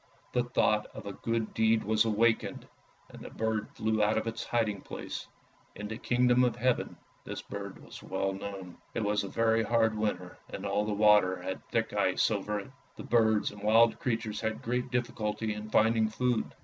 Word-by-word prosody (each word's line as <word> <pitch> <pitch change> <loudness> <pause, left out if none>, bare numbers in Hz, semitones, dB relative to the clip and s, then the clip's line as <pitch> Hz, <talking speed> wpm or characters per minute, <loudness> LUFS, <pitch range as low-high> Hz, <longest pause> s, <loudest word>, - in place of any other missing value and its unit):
The 125 0 +1
thought 105 -3 +2
of - - -8
a 100 - -5
good 115 +1 -2
deed 110 0 +3
was 110 +1 +2
awakened, 115 +1 +1 0.4
and - - -12
the - - -8
bird 110 -1 -2
flew 110 0 0
out 105 +1 +2
of 110 - -1
its 115 0 -3
hiding 110 -4 0
place; - - -6 0.5
in 105 - -5
the 110 +1 -6
Kingdom 125 0 +3
of 125 - +2
Heaven 125 +1 0 0.3
this - - -6
bird - - -7
was - - -11
well 95 0 -2
known. 95 -2 -7 0.2
It 115 - 0
was 105 0 +1
a - - -4
very 115 +1 +2
hard 110 0 +2
winter, 90 -4 -3
and - - -6
all 105 - 0
the 105 - -2
water 105 -3 +4
had 95 +1 -4
thick - - 0
ice - - +2
over 105 0 -1
it. 130 - -13 0.2
The - - -8
birds 110 -3 +3
and 105 0 -12
wild 115 +2 +4
creatures 115 -3 -2
had 110 -1 -3
great 125 +2 -1
difficulty 110 -3 -2
in 105 +1 -7
finding 110 0 +3
food. 125 +1 -1
110 Hz, 190 wpm, -30 LUFS, 105-115 Hz, 0.5 s, water